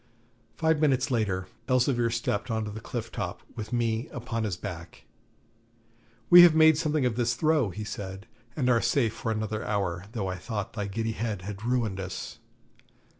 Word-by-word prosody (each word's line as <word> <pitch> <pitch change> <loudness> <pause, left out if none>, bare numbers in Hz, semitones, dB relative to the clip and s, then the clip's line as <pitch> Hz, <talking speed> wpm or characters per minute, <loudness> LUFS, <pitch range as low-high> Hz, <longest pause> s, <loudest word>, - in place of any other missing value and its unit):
Five 160 -1 +2
minutes 135 -3 +2
later 100 -6 0 0.2
Elzevir 125 -2 +2
stepped 115 -1 -2
on 110 -1 -1
to 105 - -5
the 110 - -7
cliff 115 0 -5
top, - - -4
with 110 -1 -6
me 115 -1 0
upon 115 -2 -3
his 95 -5 -2
back. 85 -1 -8 1.3
'We 175 0 +12
have 175 -2 +8
made 160 0 +7
something 155 -4 +1
of 120 -2 0
this 120 -1 +1
throw,' 155 -4 +2
he 105 +4 -6
said, 100 -2 -6 0.3
'and 130 -5 0
are 120 -2 +4
safe 115 -6 +1
for 115 -1 -3
another 110 0 -2
hour, 95 -4 -2
though 105 -6 -2
I 95 0 -3
thought 105 +1 -4
thy 105 -3 -3
giddy 115 +3 -2
head 110 -4 -3
had 100 +1 -7
ruined 115 -6 0
us.' 95 -1 -6
115 Hz, 175 wpm, -28 LUFS, 105-125 Hz, 1.3 s, We